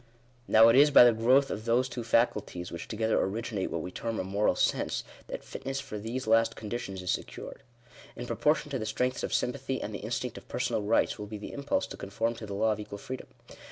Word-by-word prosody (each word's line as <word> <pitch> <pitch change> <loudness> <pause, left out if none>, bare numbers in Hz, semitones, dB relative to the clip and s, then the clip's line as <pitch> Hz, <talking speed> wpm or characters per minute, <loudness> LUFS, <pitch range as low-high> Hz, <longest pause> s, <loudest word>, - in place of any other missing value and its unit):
Now 110 +1 +7
it 115 - +5
is 145 +3 +7
by 140 - +9
the 120 -1 +6
growth 130 +5 +3
of 110 - -5
those 120 +2 +2
two 120 -1 -5
faculties 105 -6 0
which 85 0 -6
together 110 0 +1
originate 105 0 -2
what 80 - -3
we 90 - -6
term 115 +2 -3
a - - -1
Moral 100 +3 +1
Sense, - - 0 0.2
that - - -6
fitness 135 0 -5
for 105 -5 -6
these 115 +5 -4
last 115 +1 +3
condi 110 +2 -4
tions 95 -5 -6
is 90 - 0
secured. - - -5 0.5
In 120 - -6
proportion 150 +3 +1
to 135 - -1
the 110 - -3
strengths 125 +4 -1
of - - -3
sympathy, 135 +1 -1
and - - -5
the - - -4
instinct - - -3
of - - -23
personal - - -1
rights, 105 +3 +1
will 105 - -5
be 105 +1 -6
the 105 - -8
impulse 140 0 -1
to - - -9
con 100 - -7
form 115 +3 0
to 110 - -8
the 100 - -5
law 110 +2 +2
of 105 - -2
equal 105 -1 -7
freedom. 130 +5 -7
115 Hz, 235 wpm, -29 LUFS, 105-125 Hz, 0.5 s, by